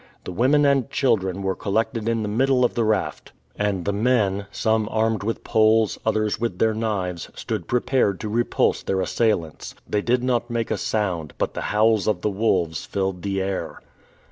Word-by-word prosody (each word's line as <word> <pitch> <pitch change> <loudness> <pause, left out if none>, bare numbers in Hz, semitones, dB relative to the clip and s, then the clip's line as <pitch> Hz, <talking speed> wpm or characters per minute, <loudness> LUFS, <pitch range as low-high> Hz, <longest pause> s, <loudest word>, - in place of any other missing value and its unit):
The - - -6
women 135 +10 +3
and 140 -4 +2
children 100 -7 0
were 95 0 0
collected 110 +2 -1
in 115 -1 0
the - - -2
middle 125 +4 +2
of - - 0
the 115 - 0
raft, 110 -1 -1 0.2
and 100 -4 -1
the 100 - 0
men, 100 -3 +1
some 110 -1 0
armed 110 -1 0
with 115 +2 -3
poles, 110 -1 +3
others 110 -1 0
with 115 -6 -2
their 110 +2 +2
knives, 100 -6 -3
stood - - -4
prepared 125 -5 +1
to 110 - -3
repulse 115 +3 +1
their 95 -1 -1
assailants. 90 -3 -1
They 105 - 0
did 125 +3 +1
not 120 -2 0
make 115 -1 -2
a - - +1
sound, 90 -8 -2
but - - -1
the - - -4
howls 110 -1 +3
of 100 -5 +1
the 105 - 0
wolves 95 -6 0
filled 95 -2 -2
the 95 0 -1
air. 95 -1 -4
110 Hz, 185 wpm, -23 LUFS, 95-115 Hz, 0.2 s, women